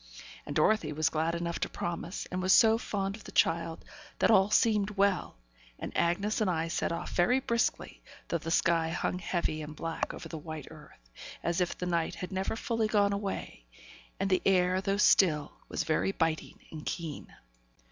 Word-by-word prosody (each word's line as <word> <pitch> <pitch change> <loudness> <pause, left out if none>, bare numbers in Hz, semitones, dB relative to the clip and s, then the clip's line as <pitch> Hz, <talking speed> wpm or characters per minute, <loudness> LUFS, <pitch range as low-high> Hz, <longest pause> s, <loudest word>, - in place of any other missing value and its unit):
And - - -5
Dorothy 215 -9 +3
was 155 +1 +1
glad 160 +2 0
enough 170 0 -3
to - - -1
promise, 175 +2 -4
and 185 - -2
was 185 0 +4
so 225 -1 +6
fond 195 -4 -2
of 220 - -13
the - - -10
child, 165 0 +1 0.3
that - - +3
all 195 -1 +5
seemed 210 -2 +3
well; 195 - +1 0.4
and - - -6
Bessy 200 +6 +1
and 200 - +1
I 165 -1 -1
set - - -1
off 170 +1 -4
very 245 +9 +3
briskly, 235 -3 -1 0.3
though 170 - -1
the 160 - -6
sky 165 -1 +2
hung 175 +2 -2
heavy 170 -4 -2
and 150 0 -7
black 165 +1 -3
over - - -8
the 160 - -6
white 155 -1 -7
earth, 105 - -16 0.3
as 170 +1 0
if 180 - -1
the 180 - -3
night 170 -2 0
had 180 - -6
never 190 +3 -2
fully 225 -1 -1
gone 205 -2 +2
away, 195 - -5 0.5
and 195 - 0
the 185 - +3
air, 185 -1 +3
though 195 +1 0
still, 155 -8 +4 0.2
was - - -1
very 160 +4 +1
biting 165 -4 -1
and 155 -2 -7
keen. 165 -4 -5
175 Hz, 190 wpm, -30 LUFS, 165-200 Hz, 0.5 s, so